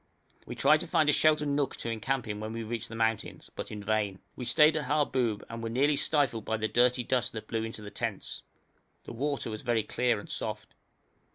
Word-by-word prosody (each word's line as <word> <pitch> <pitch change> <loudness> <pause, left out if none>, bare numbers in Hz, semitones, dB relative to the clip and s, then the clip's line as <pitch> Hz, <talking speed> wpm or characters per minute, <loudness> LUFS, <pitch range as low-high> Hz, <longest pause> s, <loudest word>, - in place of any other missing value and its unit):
We - - -5
tried 150 +3 +5
to - - -5
find 155 -3 +3
a - - +6
sheltered 155 -1 +3
nook 140 -1 0
to 115 - -4
encamp 120 +3 -2
in 105 -1 -4
when 110 +1 -5
we 115 0 -4
reached 115 0 -4
the 115 - -7
mountains, 115 -1 -1
but - - -5
in 105 -1 -6
vain. 105 -2 0 0.2
We 125 - -5
stayed 150 +6 +5
at 155 - -1
Harboub, 130 -8 +1
and 115 0 -6
were 115 - -3
nearly 140 +5 +3
stifled 140 -7 +2
by 110 - -1
the 110 0 0
dirty 125 +2 +3
dust 125 +1 0
that 110 - -6
blew 115 -1 -1
into 110 -1 -6
the 105 - -8
tents. - - -4 0.6
The - - -8
water 140 -1 -2
was 110 - -5
very 120 -3 +1
clear 120 +1 +1
and - - -10
soft. - - -5
120 Hz, 220 wpm, -30 LUFS, 110-140 Hz, 0.6 s, a